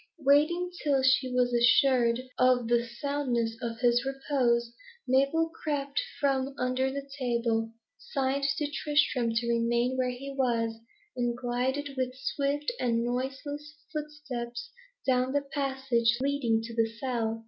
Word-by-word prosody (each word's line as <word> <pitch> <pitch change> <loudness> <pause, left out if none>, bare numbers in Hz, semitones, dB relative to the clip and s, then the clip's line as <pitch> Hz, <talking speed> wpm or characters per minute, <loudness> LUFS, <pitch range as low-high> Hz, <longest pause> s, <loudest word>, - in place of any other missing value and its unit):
Waiting 325 +6 +4
till 280 -3 +2
she 260 0 +3
was 250 -1 +2
assured 240 0 +4 0.2
of 255 -2 +4
the 235 0 +3
soundness 240 -3 -1
of 230 -1 -4
his 240 -1 +3
repose, 260 -4 0 0.3
Mabel 275 +6 +2
crept 285 -2 -1 0.2
from 275 -1 0
under 255 +1 0
the 280 0 -5
table, 235 -3 0 0.3
signed 275 +1 -1
to 295 -1 -2
Tristram 290 -6 +1
to 235 +1 0
remain 235 +2 +1
where 255 -1 +1
he 270 +3 -6
was, 230 -4 +1 0.4
and 240 -1 -1
glided 255 +4 -1
with 255 -1 -1
swift 280 - -1
and 230 -1 +1
noiseless 270 +5 -4 0.2
footsteps 295 0 -5 0.3
down 255 0 +2
the 285 0 0
passage 265 -4 +1
leading 260 -5 +1
to 230 +1 -7
the 225 -1 +3
cell. 230 -3 -2
255 Hz, 135 wpm, -29 LUFS, 235-280 Hz, 0.4 s, Waiting